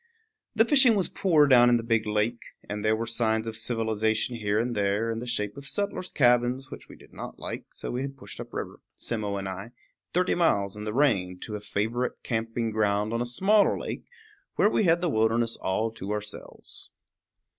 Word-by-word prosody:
The 225 +1 +5
fishing 260 -3 +6
was 190 -5 0
poor 160 -6 +4
down 120 -3 +6
in 120 - +5
the 115 - -4
big 115 -1 +1
lake, 105 +3 0 0.3
and 105 0 -4
there 110 0 +3
were 115 +1 -2
signs 110 -1 0
of 115 -1 -5
civilization 110 0 0
here 105 -2 0
and 120 +2 0
there, 105 +3 +1
in 115 - -3
the 125 - -6
shape 105 -4 -1
of 140 -1 -8
settlers' 200 +1 -3
cabins, 125 0 +2
which - - -10
we - - -11
did - - -19
not - - -8
like; - - -5
so - - -5
we 125 - -2
had 135 0 -5
pushed 130 - -10
up - - -7
river, - - -5 0.2
Simmo 105 -4 -3
and 95 -1 -4
I, 100 +5 -7 0.4
thirty 180 +1 +2
miles 100 - +1
in 105 0 -7
the 105 - -2
rain, 100 -11 +2
to 110 - -6
a 105 - -5
favorite 110 +5 -1
camping 115 0 -2
ground 105 0 +1
on 115 - 0
a 120 - -1
smaller 195 - +3
lake, - - -5 0.5
where 210 - +4
we 215 - +2
had 170 0 +4
the 180 - +1
wilderness 115 -1 +2
all 110 +4 -1
to 105 -3 -8
ourselves. 105 0 -6
115 Hz, 205 wpm, -27 LUFS, 105-130 Hz, 0.5 s, fishing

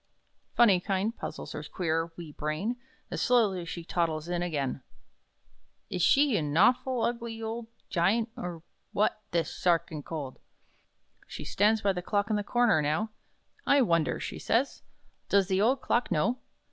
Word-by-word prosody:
Phunny 210 -6 +6
kind 200 +3 0
puzzles - - -6
her - - -5
queer, 165 -1 -2
wee 165 -3 -8
brain 155 +11 -2 0.4
As - - -2
slowly 210 -8 +3
she 170 0 -6
toddles 165 -2 -1
in 175 0 -1
again: 145 -6 -2 1.1
"Is 180 - -2
she 275 - +4
a - - 0
nawful, 225 - +3
ugly, 235 -1 -2
old 225 +1 -4 0.2
Giant 210 +7 +1
or 170 -2 -6 0.3
what 215 +1 +1
this 170 -1 -1
'Sa 175 -2 +4
archinkold?'" 150 -4 -7 0.9
She - - -7
stands 210 +2 +2
by 200 -1 +3
the 180 - -3
clock 205 +4 0
in - - +2
the 205 - 0
corner, 240 -6 +3
now: 155 +10 0 0.6
"I 280 -1 +5
wonder," 170 -7 +1
she - - -5
says, 255 +5 0 0.5
"does 200 -1 +3
the 190 0 +2
old 255 +5 +3
clock 240 +1 +1
know?" 210 +10 +1
195 Hz, 155 wpm, -29 LUFS, 165-225 Hz, 1.1 s, Phunny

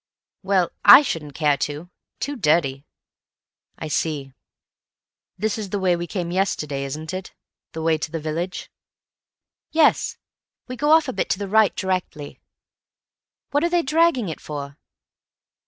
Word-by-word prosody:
"Well, 190 -3 +1
I 295 - +10
shouldn't 150 - -4
care 150 -3 +2
to. 150 +6 -5 0.3
Too 285 +1 -3
dirty." 150 - +1 0.9
"I 160 - -6
see.... 145 -3 -2 1.0
This 215 +3 -1
is 205 -3 -5
the 205 - -2
way 185 -2 +2
we 175 0 -5
came 175 -1 -4
yesterday, 150 -7 -1
isn't 155 +5 -6
it? 185 0 -7 0.4
The 160 -1 -5
way 160 -1 +2
to 155 - -4
the 165 - -4
village?" 165 +4 -4 1.0
"Yes. 315 -1 +2 0.5
We 255 - -6
go 295 +4 0
off 315 -1 +5
a 260 - -3
bit - - -2
to - - +1
the 200 0 -4
right 215 0 +3
directly. 180 -6 -3 1.1
What 290 +2 +1
are 340 - +2
they 345 -1 +1
dragging 305 - +2
it 160 - -6
for?" 140 -2 -7
175 Hz, 150 wpm, -22 LUFS, 150-220 Hz, 1.1 s, I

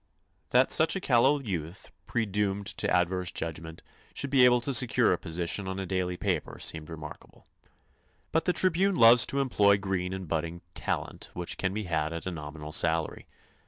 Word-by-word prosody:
That 125 +2 +3
such 160 +4 +5
a - - -1
callow 140 -1 +3
youth, 90 - -6 0.2
predoomed 100 -3 -1
to - - -2
adverse 90 0 +1
judgment, 80 -1 -6 0.3
should 140 - -4
be 135 -3 +5
able 125 0 +5
to 140 +3 -3
secure 125 -1 +4
a - - -1
position 85 +4 -3
on 95 0 -4
a 95 - -4
daily 90 -1 -2
paper 90 -6 -3
seemed 80 -1 -2
remarkable. 80 -2 -11 0.9
But 160 0 0
the 180 - +2
Tribune 185 +2 +2
loves 120 -2 +7
to 140 - -2
employ 105 -7 +3
green 95 -2 -3
and 95 -1 -6
budding 85 +2 -3
"talent," - - -4
which 90 -1 -4
can 95 - -1
be 105 +2 -4
had 80 -3 -2
at 85 - -6
a 95 - -3
nominal 75 -1 -8
salary. 80 0 0
95 Hz, 175 wpm, -28 LUFS, 85-120 Hz, 0.9 s, loves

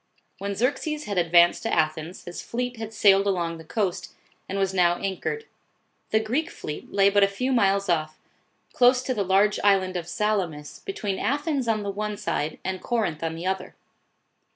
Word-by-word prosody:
When 200 0 -3
Xerxes 290 +6 -1
had 200 -7 -1
advanced 170 0 +5
to 225 - -2
Athens, 155 +2 -1
his 175 - -6
fleet 245 0 -4
had 220 -1 -6
sailed 200 -2 +4
along 170 -4 -1
the - - -10
coast, 190 +1 -2 0.4
and 195 - -2
was 195 -1 0
now 175 -2 +4
anchored. 195 - -3 0.6
The 220 - +3
Greek 255 +10 -1
fleet 150 - -7
lay 200 0 +4
but 205 0 +4
a - - +6
few 250 +7 -2
miles 200 -4 +2
off, 155 -3 0 0.6
close 250 0 +4
to 255 - -1
the 210 -4 0
large 195 +2 +3
island 190 -2 +3
of 175 -2 -3
Salamis, 175 -6 -2
between 210 - -3
Athens 285 -2 -1
on 215 -2 +1
the 200 - -2
one 210 +1 -3
side 155 -4 -2
and 190 -1 -3
Corinth 215 -10 -1
on 165 0 -2
the 165 +2 -6
other. 190 0 -3
200 Hz, 180 wpm, -25 LUFS, 175-225 Hz, 0.6 s, a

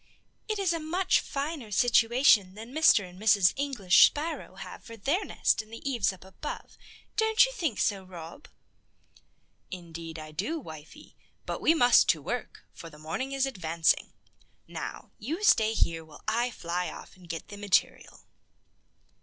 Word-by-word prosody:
"It 430 -1 -2
is 385 -4 +1
a 330 - -2
much 355 +4 +1
finer 280 -4 -5
situation 225 -3 +4
than 225 +4 -10
Mr. 305 -11 +4
and 180 +2 -14
Mrs. 200 -4 +4
English 265 -10 +5
Sparrow 315 +3 -5
have - - -10
for 230 -1 -11
their 290 - 0
nest - - 0
in 215 - -19
the 230 +5 -8
eaves 240 -8 +1
up 190 -1 -14
above. 190 +10 -8 0.4
Don't 440 +2 +5
you - - -5
think 330 - -2
so, 195 -2 0
Rob?" 175 - -11 1.2
"Indeed 165 -2 -8
I 155 -1 -9
do, 210 - -3
wifey; 155 - -12 0.3
but - - -4
we 325 - +4
must 245 -6 +5
to - - +3
work, - - -5
for 165 - -10
the 150 - -15
morning 160 - -4
is 275 0 +1
advancing. 170 -9 0 0.5
Now, - - -7
you 310 - -4
stay 220 - +4
here, 165 -5 0
while 155 -2 -16
I 235 +3 +1
fly 180 -5 -3
off - - -11
and 180 -2 -17
get 165 -1 -6
the 205 - -9
material." 205 -2 0
220 Hz, 160 wpm, -28 LUFS, 180-285 Hz, 1.2 s, English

